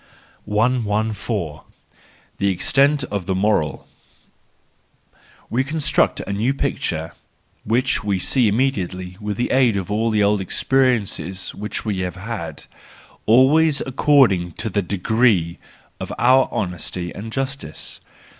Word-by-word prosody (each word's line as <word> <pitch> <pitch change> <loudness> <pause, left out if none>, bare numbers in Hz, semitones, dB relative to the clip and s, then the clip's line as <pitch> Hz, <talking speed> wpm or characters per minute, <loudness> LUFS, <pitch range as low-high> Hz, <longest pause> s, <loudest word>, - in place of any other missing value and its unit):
114. 105 -5 -1 0.8
The 100 - +1
Extent 135 +10 +2
of 100 -3 -3
the 95 - 0
Moral 95 -5 0 1.6
.—We 125 +3 +1
construct 150 +1 +1
a 100 - -4
new 115 +7 0
picture, 85 - -2 0.5
which 125 +2 +1
we 100 -2 0
see 120 +5 +2
immediately 95 -6 -1
with 105 -1 -3
the 120 - -1
aid 125 -5 +3
of 95 +1 -4
all 110 +2 +1
the 105 -2 +2
old 100 0 +2
experiences 100 - 0
which 105 +2 -5
we 105 -3 -1
have 90 -1 -3
had, 95 -6 -6 0.6
always 140 +6 +5
according 130 - +3
to 110 +4 -4
the 100 - +1
degree 100 -2 +1 0.4
of - - -6
our 130 +2 +4
honesty 90 -1 -4
and 110 +2 -7
justice. 135 - -5
105 Hz, 120 wpm, -21 LUFS, 95-130 Hz, 1.6 s, always